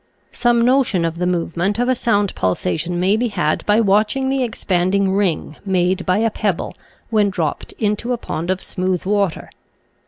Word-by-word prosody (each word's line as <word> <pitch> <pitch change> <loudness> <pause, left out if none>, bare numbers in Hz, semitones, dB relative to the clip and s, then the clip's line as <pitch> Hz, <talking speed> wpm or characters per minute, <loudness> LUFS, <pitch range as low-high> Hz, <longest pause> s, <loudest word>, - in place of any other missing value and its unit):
Some 240 -1 +2
notion 250 -9 +2
of 165 0 -3
the 180 - 0
movement 175 +3 -1
of 245 +1 +1
a 255 - +3
sound 205 -5 +1
pulsation 155 - -1
may 190 +3 +3
be 240 +2 0
had 155 -8 -1
by 210 +1 +4
watching 215 +6 +2
the 270 -1 +1
ex 235 -3 -5
panding 190 +1 +1
ring 180 -6 -1
made 185 -1 0
by 185 +1 +3
a 225 +1 +1
pebble 205 -5 -2 0.4
when 210 -2 +3
dropped 170 -6 -3
into 210 +3 -1
a 245 - 0
pond 170 -6 -5
of 185 0 -1
smooth 185 -1 -2
water. 200 -3 -1
200 Hz, 180 wpm, -19 LUFS, 180-220 Hz, 0.4 s, by